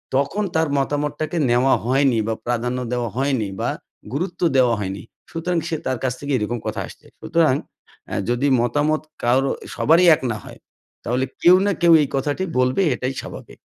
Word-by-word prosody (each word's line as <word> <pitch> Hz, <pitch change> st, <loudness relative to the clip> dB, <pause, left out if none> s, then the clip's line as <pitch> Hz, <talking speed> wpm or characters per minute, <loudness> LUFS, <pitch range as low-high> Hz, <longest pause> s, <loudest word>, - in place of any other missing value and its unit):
তখন 140 Hz, +10 st, 0 dB
তার 160 Hz, -1 st, +2 dB
মতামতটাকে 150 Hz, +3 st, -2 dB
নেওয়া 125 Hz, +3 st, +3 dB
হয়নি 130 Hz, -1 st, +2 dB
বা 110 Hz, -, 0 dB
প্রাধান্য 120 Hz, +1 st, -1 dB
দেওয়া 120 Hz, -2 st, -1 dB
হয়নি 130 Hz, -6 st, 0 dB
বা -, -, 0 dB, 0.4 s
গুরুত্ব 175 Hz, +6 st, -3 dB, 0.2 s
দেওয়া 125 Hz, -2 st, +4 dB
হয়নি। 95 Hz, -1 st, -4 dB, 0.3 s
সুতরাং 170 Hz, +2 st, -2 dB
সে 165 Hz, -, -1 dB
তার 130 Hz, -1 st, -1 dB
কাছ 130 Hz, -, 0 dB
থেকে 145 Hz, 0 st, -5 dB
এরকম 115 Hz, +2 st, -2 dB
কথা -, -, -3 dB
আসছে। -, -, -15 dB, 0.2 s
সুতরাং 160 Hz, -5 st, +2 dB, 0.5 s
অ্যা -, -, -4 dB
যদি 120 Hz, +4 st, +1 dB
মতামত 145 Hz, +6 st, +1 dB, 0.2 s
কারো 130 Hz, +3 st, +2 dB, 0.2 s
সবারই 170 Hz, +4 st, +4 dB
এক -, -, -11 dB
না 110 Hz, -, -3 dB
হয় -, -, -12 dB, 0.4 s
তাহলে 125 Hz, +2 st, 0 dB, 0.2 s
কেউ 180 Hz, +1 st, +7 dB
না, 200 Hz, -, +2 dB
কেউ 170 Hz, -1 st, +6 dB
এই 145 Hz, -, +1 dB
কথাটি 145 Hz, +7 st, -1 dB, 0.2 s
বলবে 130 Hz, +9 st, +2 dB
এটাই 130 Hz, +2 st, -3 dB
স্বাভাবিক। -, -, -10 dB
135 Hz, 170 wpm, -21 LUFS, 120-155 Hz, 0.5 s, কেউ